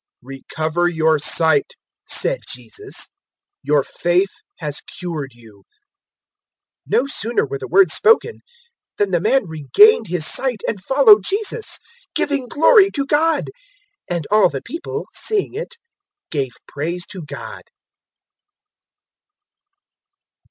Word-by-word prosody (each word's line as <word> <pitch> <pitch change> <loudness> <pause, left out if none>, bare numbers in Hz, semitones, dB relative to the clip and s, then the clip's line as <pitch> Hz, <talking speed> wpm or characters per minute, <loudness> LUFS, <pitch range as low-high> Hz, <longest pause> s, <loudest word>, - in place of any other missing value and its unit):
018:042 - - -44 0.3
"Recover 160 +4 -1
your 160 -2 +2
sight," 160 -1 +3 0.3
said - - +1
Jesus: 410 0 -6 0.5
"your 145 -2 +2
faith 175 +6 0 0.3
has 150 -3 -5 0.2
cured 155 -8 -5
you." 110 -4 -18 1.3
018:043 215 - +2
No 245 - +2
sooner 240 -4 0
were 140 0 -5
the - - -7
words 185 -1 +4
spoken 455 +1 +3 0.6
than 205 -2 0
the 175 -2 +1
man 245 +4 +2
regained 190 - +4
his 175 -2 -1
sight 250 +2 0
and 200 - -3
followed 225 -5 +6
Jesus, 430 - -2 0.4
giving 285 -3 -1
glory 390 - +5
to 280 -7 -2
God; 310 +4 +1 0.6
and 170 -3 -2
all 215 0 +5
the 135 -2 -6
people, 335 +2 -6
seeing 420 -4 -1
it, 480 +3 -6 0.6
gave 135 -5 -2
praise 170 +4 -4
to 190 - -9
God. 145 -2 -8
190 Hz, 120 wpm, -19 LUFS, -, 1.3 s, followed